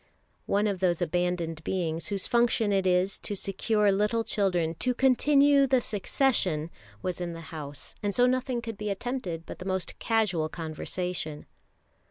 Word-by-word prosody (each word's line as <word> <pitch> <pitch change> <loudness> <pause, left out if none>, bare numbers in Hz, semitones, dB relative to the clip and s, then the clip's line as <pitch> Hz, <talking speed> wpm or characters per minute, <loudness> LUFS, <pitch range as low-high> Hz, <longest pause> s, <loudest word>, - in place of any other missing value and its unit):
One 205 +1 +2
of 200 -3 -1
those 175 -2 +2
abandoned 175 -2 -1
beings 165 -3 -2
whose 200 -2 -2
function 235 -3 +2
it 190 -1 +2
is 185 +2 +2
to 205 - -3
secure 205 +2 +1
little 210 +3 +1
children 185 -7 0
"to 250 -1 +1
continue 275 +2 +4
the 260 0 +4
succession" 195 - 0 0.3
was 180 -1 -3
in 175 -1 -3
the 165 - -7
house, 145 -2 -7
and 205 -1 -1
so 245 - +5
nothing 250 -1 0
could 225 -3 -6
be 210 0 -2
attempted 195 -6 -3
but - - -9
the 180 - -7
most 185 -2 -3
casual 195 -9 +1
conversation. 160 -1 -4
195 Hz, 160 wpm, -28 LUFS, 175-230 Hz, 0.3 s, so